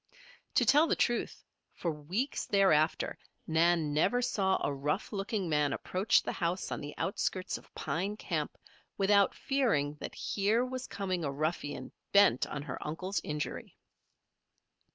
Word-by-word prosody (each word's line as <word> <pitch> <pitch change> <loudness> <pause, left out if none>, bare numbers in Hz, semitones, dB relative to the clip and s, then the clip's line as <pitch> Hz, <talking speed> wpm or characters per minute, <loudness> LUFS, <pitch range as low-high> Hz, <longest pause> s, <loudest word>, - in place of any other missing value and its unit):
To - - +4
tell 300 +3 +6
the - - +2
truth, 240 - 0 0.3
for 170 - -2
weeks 175 - -3
thereafter, 170 -6 +3 0.3
Nan 160 -1 +2
never 190 +11 +3
saw 195 -6 +1
a 140 - 0
rough 150 +10 -2
looking 195 -1 -2
man 150 -3 +2
approach 195 +5 +2
the - - -2
house 175 +2 -2
on - - -3
the 145 0 -7
outskirts 190 -1 -1
of - - -21
Pine 195 +5 -2
Camp, - - -3 0.4
without 200 0 +4
fearing 230 - +1
that - - -6
here 215 +5 +1
was 255 0 -5
coming 185 -3 -2
a 140 - -1
ruffian 145 0 -3 0.2
bent 200 -11 +5
on 140 - -5
her - - -5
uncle's 180 +6 -3
injury. 150 -1 -4
185 Hz, 145 wpm, -31 LUFS, 150-205 Hz, 0.4 s, tell